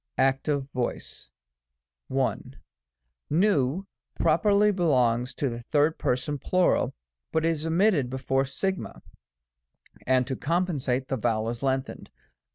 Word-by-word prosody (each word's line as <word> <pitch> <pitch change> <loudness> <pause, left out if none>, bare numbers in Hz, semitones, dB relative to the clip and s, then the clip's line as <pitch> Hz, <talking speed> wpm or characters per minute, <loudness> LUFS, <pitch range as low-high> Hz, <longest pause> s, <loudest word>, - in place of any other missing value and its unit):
active 135 +2 +1
voice. 120 - -4 0.8
1. 130 0 -2 0.8
N 160 -2 +2 0.4
properly 200 +6 +4
belongs 125 - +1
to 140 - -1
the 120 -1 -5
3d 150 +1 +2
Person 135 +3 -1
Plur., 180 +6 +2 0.4
but 160 0 +1
is 165 -1 0
omitted 165 - +2
before 130 +1 0
o - - 0
(see 165 +8 -1
§8. 190 - -6
5); - - -17 1.1
and 130 -1 +3
to 130 0 -3
compensate, 145 -6 -1
the 135 - -1
vowel 110 -1 0
is 120 0 -5
lengthened. 135 0 -2
135 Hz, 125 wpm, -26 LUFS, 130-165 Hz, 1.1 s, properly